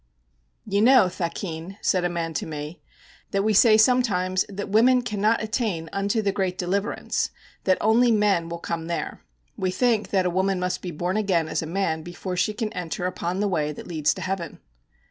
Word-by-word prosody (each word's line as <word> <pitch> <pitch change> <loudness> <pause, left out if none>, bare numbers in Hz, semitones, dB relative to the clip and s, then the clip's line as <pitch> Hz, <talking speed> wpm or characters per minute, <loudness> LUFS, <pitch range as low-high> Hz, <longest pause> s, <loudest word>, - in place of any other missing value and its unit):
_ - - -8
'You 200 - +3
know, 235 -5 +6
thakin,' 170 +1 -5
said 185 -2 +1
a 175 - +1
man 165 -1 -3
to 145 - -3
me, 150 +1 -7 0.5
'that 195 0 0
we 215 +1 +2
say 215 +1 +6
sometimes 210 -6 +3
that 200 0 -5
women 245 +5 +4
cannot 215 -1 +1
attain 215 - -2
unto 200 +3 0
the 200 - +1
great 190 -2 -2
deliverance, 195 +5 -1 0.4
that 185 -1 +3
only 235 +3 +4
men 205 -6 +2
will 170 - -4
come 165 -1 -4
there. 170 -1 -4 0.4
We 185 - 0
think 220 +3 +1
that 190 -2 +1
a 180 - +1
woman 190 +1 +1
must 180 0 -2
be 180 - -5
born 175 +4 -2
again 185 -6 +1
as - - -1
a 160 - -5
man 165 -2 -1
before 175 +2 -6
she 180 +4 +1
can 220 -1 -3
enter 180 -1 -4
upon 180 +1 -2
the 205 - +1
way 155 -6 0
that - - -10
leads 155 -4 0
to 185 - -7
heaven.' 185 -3 -4
185 Hz, 200 wpm, -24 LUFS, 170-210 Hz, 0.5 s, know